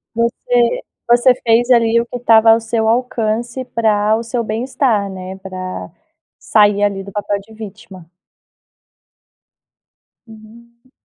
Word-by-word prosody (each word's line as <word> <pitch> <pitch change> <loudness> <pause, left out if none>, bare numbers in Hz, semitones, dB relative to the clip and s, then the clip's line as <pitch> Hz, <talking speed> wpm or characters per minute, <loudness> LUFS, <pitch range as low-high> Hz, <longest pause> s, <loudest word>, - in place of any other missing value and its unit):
Você 235 +1 0 0.3
você 240 +2 +5
fez 235 +1 +2
ali 230 -1 +3
o 235 - -4
que 245 - -7
o - - -4
estava 225 -1 +5
ao 225 - +3
seu 225 0 -2
alcance 235 +1 -1
para 215 -3 +1
o 225 - -1
seu 235 +1 -3
bem 220 +2 -3
estar, 250 -6 0
né, 185 0 -8
pra 185 -1 -7 0.5
sair 205 -1 +2
ali 195 -1 -1
do 200 - -10
papel 205 0 -2
de 220 +3 -18
vítima. 205 -5 -12 2.2
Uhum. 235 +3 -17
225 Hz, 135 wpm, -17 LUFS, 205-235 Hz, 2.2 s, você